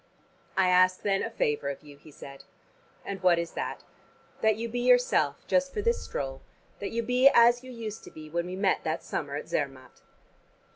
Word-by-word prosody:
"I 190 -1 +4
ask 185 0 +4
then 195 -1 +1
a 230 - -2
favor 150 -9 -1
of 140 - -6
you," 145 -1 -13
he 155 - -16
said. 140 -1 -12 0.6
"And 195 -2 -5
what 180 -2 +4
is 170 0 -3
that?" - - -5 0.6
"That 220 -1 +3
you 230 +2 -4
be 240 +2 -3
yourself 245 - +3
just 275 0 +1
for 420 - -2
this 470 0 +1
stroll: 135 -1 -5 0.4
that 200 - -4
you 235 0 -2
be 250 +3 +5
as 240 +1 +5
you 255 - -10
used 225 -3 -7
to - - -10
be 155 0 -10
when 170 +3 -2
we 180 - -5
met 195 0 +1
that - - -2
summer - - -4
at - - -5
Zermatt." - - -4
200 Hz, 200 wpm, -28 LUFS, 165-240 Hz, 0.6 s, be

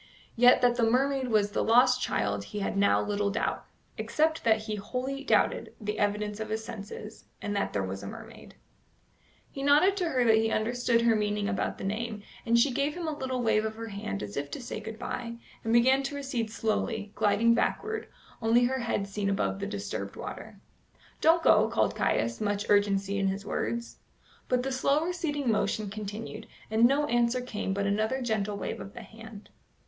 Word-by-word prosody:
Yet 245 +2 +6
that 245 0 +4
the 240 - +2
mermaid 265 +2 +1
was 210 -3 +2
the - - 0
lost 250 +2 +5
child 100 0 -1
he 210 - -5
had 195 - -2
now 200 0 +4
little 205 0 0
doubt, 200 - -2 0.3
except 315 +1 +1
that 220 -1 +3
he 215 -1 -4
wholly 255 +6 -4
doubted - - +1
the 210 -2 -3
evidence 210 0 -1
of 220 -1 -4
his 220 +1 -2
senses, 210 -1 -8
and 205 - -3
that 200 - 0
there 100 - -1
was 95 +1 -5
a 100 - -7
mermaid. - - -11 1.0
He 275 - -6
nodded 295 +8 +5
to 355 -4 0
her 255 -5 +2
that 225 -2 +5
he 225 0 +2
understood 235 +1 +1
her 230 -1 +4
meaning 210 -1 0
about 210 -2 -1
the - - -8
name, 215 +1 -3 0.2
and 235 +1 +4
she 260 +4 +4
gave 280 +4 0
him 345 -2 -4
a 310 - -2
little 260 -3 -3
wave 220 -1 +3
of 220 0 -3
her 225 0 -6
hand 105 - -4
as 100 0 -7
if 140 0 -3
to - - -6
say 240 -3 -5
good 220 0 -7
bye, 235 0 -5 0.3
and 225 - -1
began 260 +3 +5
to 275 +1 -4
recede 265 -5 -2
slowly, 220 -1 -2
gliding 210 +3 +3
backward, 435 - -1 0.3
only 230 +2 +4
her 260 +2 +1
head 225 -4 -1
seen 200 0 -2
above 195 0 0
the 200 - -3
disturbed 205 -1 -5
water. - - -8 0.6
"Don't 330 +1 +4
go," 215 +1 +5
called 230 - +1
Caius, 115 +1 0
much 205 -1 -1
urgency 200 -1 +2
in 195 - +1
his 195 +1 -2
words. 235 +2 -3 0.5
But 250 0 +2
the 270 - -2
slow 275 +4 +2
receding 295 -7 -1
motion 215 -1 -1
continued, 215 +1 -6 0.2
and 220 +2 +5
no 280 +4 +3
answer 240 -1 +2
came 215 -5 -4
but 200 +1 -1
another 215 +6 0
gentle 210 -3 -1
wave - - -4
of 195 - -10
the 235 - -8
hand. 220 0 -12
225 Hz, 195 wpm, -29 LUFS, 205-250 Hz, 1.0 s, Yet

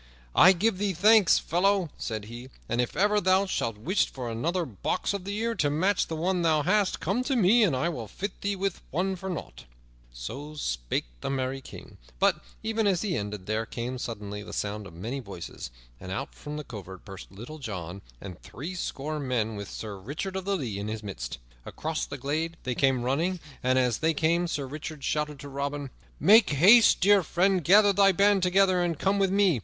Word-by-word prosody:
"I 185 - +8
give 190 +2 0
thee 200 -1 0
thanks, 210 +1 +6
fellow," 185 -1 +1
said 110 -3 -4
he, 120 +4 -9 0.2
"and 120 +1 +1
if 125 - -4
ever 205 +2 +3
thou 190 +1 +3
shouldst 115 - -2
wish 185 - +2
for 125 -3 -5
another 170 +10 -1
box 115 - -2
of 200 -2 -4
the 200 +1 -3
ear 230 +1 0
to 150 -9 +1
match 180 +7 +1
the 165 - -4
one 180 +3 0
thou 155 -3 +2
hast, 200 +3 +2
come 200 +9 0
to 270 - 0
me 230 +1 +5
and 185 -11 +3
I 130 +6 0
will 125 -10 -4
fit 195 - -6
thee 200 0 -1
with 195 -1 -2
it 190 +3 0
for 190 - -5
nought." 105 - -7 0.5
So 135 - -7
spake - - -2
the - - -4
merry 135 0 -2
King; - - -12 0.2
but, - - +2 0.2
even 220 -1 0
as 190 -2 +1
he 195 -5 -1
ended, 105 -4 -4
there 110 +2 -2
came 125 +2 -4
suddenly 105 -4 -5
the - - -9
sound 105 0 -3
of 85 - -13
many 115 +10 -4
voices, 100 - -8 0.3
and 95 - -8
out 95 - -4
from 150 0 -7
the 150 - -5
covert 95 -7 -10
burst 95 -3 -10
Little 120 +11 -9
John 95 - -6 0.2
and 90 -3 -9
threescore 155 -1 -5
men, 120 -5 -1
with 100 -1 -6
Sir 105 -3 -7
Richard 150 - -5
of 190 -1 -3
the 200 0 +1
Lea 115 - -4
in 100 - -4
the 110 0 -3
midst. 60 -12 -6 0.3
Across 160 - -4
the 145 - -6
glade 155 +5 -2
they 130 - -1
came 130 -1 +2
running, 165 +9 0 0.2
and, 130 +1 +2
as 125 -3 +2
they 160 0 +1
came, 170 +3 +2
Sir 145 -4 -2
Richard 150 +1 -7
shouted 150 -1 -1
to 145 - -8
Robin: 140 0 -4 0.3
"Make 220 +2 +6
haste, 195 - +6
dear 200 +1 +6
friend, 180 +2 +1
gather 205 +5 +6
thy 195 0 +5
band 200 +1 +3
together 185 0 +3
and 170 -3 0
come 195 +4 +1
with 195 -1 +3
me! 190 -8 +3
155 Hz, 205 wpm, -27 LUFS, 120-190 Hz, 0.5 s, I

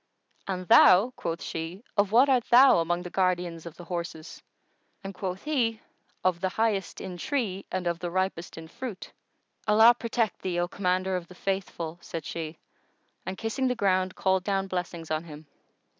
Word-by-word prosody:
"And 185 -2 -4
thou," 195 +10 +7
quoth 165 0 -4
she, 165 +6 -5
"of 205 -1 +2
what 245 +5 +6
art 255 -4 +3
thou 255 -3 +7
among 175 +1 -1
the 180 - -8
guardians 175 -3 -1
of 165 - -10
the 175 - -9
horses?"; 170 -2 -6 0.6
and 195 0 -6
quoth 190 0 -5
he, 240 -7 0 0.4
"Of 180 -2 +1
the 190 - +1
highest 205 -2 -1
in 180 -1 -6
tree 205 - -2
and 185 -1 -2
of 170 -1 -1
the 175 - -3
ripest 185 -2 -2
in 160 0 -8
fruit." 215 +2 -7 0.6
"Allah 220 +3 +7
protect 230 -2 -2
thee, 180 -2 -2
O 175 - +1
Commander 185 0 0
of 175 -2 -4
the 180 - -14
Faithful!" 175 -4 -3
said 165 -3 -6
she, 160 0 -5 0.7
and 190 0 -4
kissing 230 +4 -1
ground 185 -3 +1
called 190 -1 +1
down 195 -1 0
blessings 175 -3 -5
on 155 +1 -1
him. 155 -1 -11
185 Hz, 175 wpm, -27 LUFS, 170-205 Hz, 0.7 s, thou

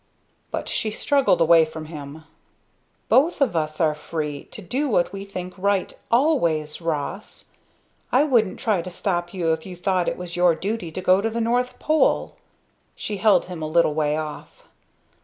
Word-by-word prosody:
But - - -4
she 220 - -1
struggled 270 -2 +2
away 165 0 +6
from 155 0 -6
him. 155 -1 -9 0.8
"Both 300 +6 +3
of 265 -10 +2
us 155 -1 -2
are 160 -3 +3
free 150 -1 -5
to - - -10
do 260 - -2
what 175 -6 +1
we 195 0 -6
think 185 -2 -6
right, 200 0 0 0.2
always 175 - +1
Ross! 165 +5 -4 0.6
I 260 +3 +5
wouldn't 235 -9 +2
try 210 -6 +1
to 180 - -7
stop 175 -1 -2
you 170 -4 0
if 160 0 -4
you 185 -2 -8
thought 180 0 0
it - - -5
was 175 -1 -7
your 175 -1 +4
duty 195 -2 -3
to 185 - -5
go 185 +1 +4
to 225 - 0
the 230 +1 -3
North 245 +2 0
Pole!" 310 0 +1 0.6
She 210 - -4
held 210 0 +4
him 180 -3 -7
a 155 - -2
little 155 -1 +3
way 150 0 0
off. 155 -1 -7
180 Hz, 175 wpm, -23 LUFS, 160-220 Hz, 0.8 s, away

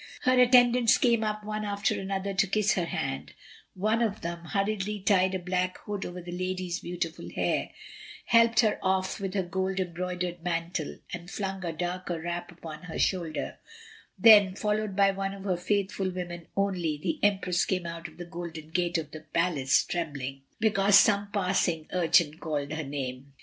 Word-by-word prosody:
Her 255 0 +3
attendants 245 -1 +6
came 235 -3 +3
up 215 0 -2
one 215 0 -3
after 200 0 0
another 195 0 -3
to 195 +1 +2
kiss 215 +2 +2
her 175 - 0
hand; 135 -5 -4 0.4
one 215 +5 +1
of 215 -3 0
them 170 0 -5
hurriedly 205 +2 -1
tied 190 -1 +3
a - - +1
black 180 0 -1
hood 205 -1 -3
over 180 +1 -7
the 175 - -7
lady's 185 -1 -3
beautiful 170 -2 -4
hair, - - -1 0.6
helped 230 0 +5
her 215 -2 +1
off 190 0 0
with 195 -1 -4
her 190 - +1
gold 190 +2 -2
embroidered 180 -1 -3
mantle, 170 -2 -2 0.2
and 175 0 -6
flung 195 -1 -4
a 170 - -2
darker 175 +1 -3
wrap 175 +2 -4
upon 160 -3 -9
her 165 - -6
shoulder; 170 -5 -1 0.6
then, 205 -4 +7
followed 210 -1 -1
by 195 0 +5
one 195 0 -3
of 195 - -10
her 190 -2 0
faithful 195 +1 -1
women 175 -2 -6
only, 180 -6 0
the 300 - -2
empress 190 -3 +2
came 185 -2 -1
out 170 0 -5
of - - -16
the 175 - -7
golden 165 -2 -7
gate 175 0 +1
of 155 -2 -5
the 155 - -7
palace, 155 -4 +1
trembling, 140 -6 -4 0.2
because 205 -2 +5
some 200 0 +4
passing 180 -5 0
urchin 165 -3 +3
called 145 -2 -3
her 160 0 -3
name. 135 -1 -5
185 Hz, 175 wpm, -28 LUFS, 170-200 Hz, 0.6 s, then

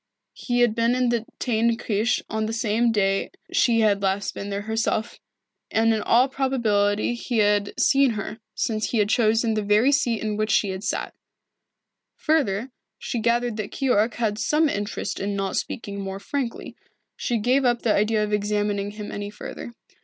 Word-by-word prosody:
He 245 -1 -1
had 240 -3 +4
been 230 +2 +2
in 250 -1 +1
the 235 -1 -1
Teyn 230 -1 +1
Kirche 220 +2 0
on 220 0 -2
the 225 +1 +1
day 195 -2 +1 0.2
she 230 -2 +3
had 205 -2 +2
last 195 +1 -1
been 200 - -6
there 200 0 -3
herself, 220 +1 -2 0.5
and 225 0 +3
in 220 - -1
all 240 +5 +4
probability 235 -6 +1
he 240 0 -3
had 205 +1 +1
seen 270 -1 +4
her, 215 +2 -5 0.2
since 215 -2 -1
he 235 - -1
had 210 -1 +2
chosen 225 +1 +2
the 215 - 0
very 210 +6 +3
seat 245 -6 +1
in 210 -1 -2
which 215 0 -1
she 205 - +2
had 190 +1 -5
sat. - - -2 1.0
Further, 260 - 0 0.3
she 240 - -4
gathered 235 0 0
that 210 -2 -4
Keyork 240 -4 +1
had 220 -3 -1
some 310 +1 +2
interest 205 -6 -3
in 200 +1 -2
not 195 -1 -2
speaking 200 -3 -4
more 195 0 -5
frankly. 255 +2 -4 0.4
She 240 - -1
gave 250 +5 +2
up 240 -1 +1
the 220 - +3
idea 215 +1 +2
of 210 0 -3
examining 205 -1 0
him 210 0 -7
any 205 0 -5
further. 210 +3 -8
220 Hz, 175 wpm, -24 LUFS, 205-240 Hz, 1.0 s, had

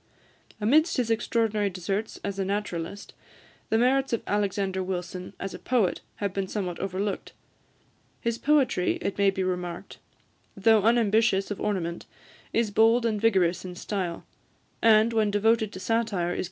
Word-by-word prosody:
Amidst 300 +11 +3
his 240 -3 0
extraordinary 220 -2 +1
deserts 195 +4 -3
as 200 -1 -4
a - - +1
naturalist, 200 -1 -4 0.6
the 220 - +3
merits 265 +3 +2
of 230 - -1
Alexander 195 -2 -1
Wilson 180 0 -5
as 195 - -5
a - - -8
poet 230 -8 +1
have 200 -2 -3
been 195 -1 -2
somewhat 185 -4 -4
overlooked. 195 +1 -3 0.9
His 235 0 -2
poetry, 270 -10 +2
it 200 - -3
may 200 -1 +5
be 190 -1 -1
remarked, 180 -2 -4 0.6
though 220 +2 +5
unambitious 220 -2 +2
of 205 - -4
ornament, 175 -5 -2 0.4
is 230 -2 +1
bold 225 +3 +4
and 215 -3 0
vigorous 185 -6 +2
in 180 -1 -7
style, 180 -2 -4 0.6
and, 225 0 +5
when 220 -2 +2
devoted 220 +1 +2
to 185 - -7
satire, 225 +4 +1
is 230 - -6
keen 200 -4 -2
and 175 0 0
vehement. 175 - -3
205 Hz, 160 wpm, -27 LUFS, 190-225 Hz, 0.9 s, may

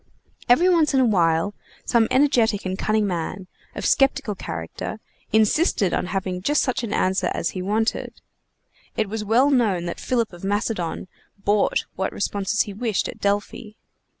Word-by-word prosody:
Every 315 +9 +5
once 330 -5 +3
in - - +4
a 260 - +4
while 175 -2 +2 0.3
some 230 -2 +3
energetic 240 -7 +2
and 185 0 -2
cunning 215 +2 +1
man, 180 0 -3 0.3
of - - -4
skeptical 270 -4 +2
character, 80 - -6 0.3
insisted 220 - +2
on - - -1
having 185 -1 -3
just 295 +9 +2
such 255 -2 -1
an 225 - -4
answer 185 -1 +1
as 170 - -1
he 185 - -5
wanted. 215 +4 -1 0.8
It 215 -2 0
was 220 0 -3
well 240 +7 +3
known 210 -10 +2
that 170 - -5
Philip 235 -6 -1
of 175 - -12
Macedon 200 -3 -2 0.3
bought 200 +1 +1
what 190 - -2
responses 200 +1 -1
he 205 - -3
wished 215 -1 -1
at - - -9
Delphi. 205 +2 -2
210 Hz, 160 wpm, -23 LUFS, 190-235 Hz, 0.8 s, Every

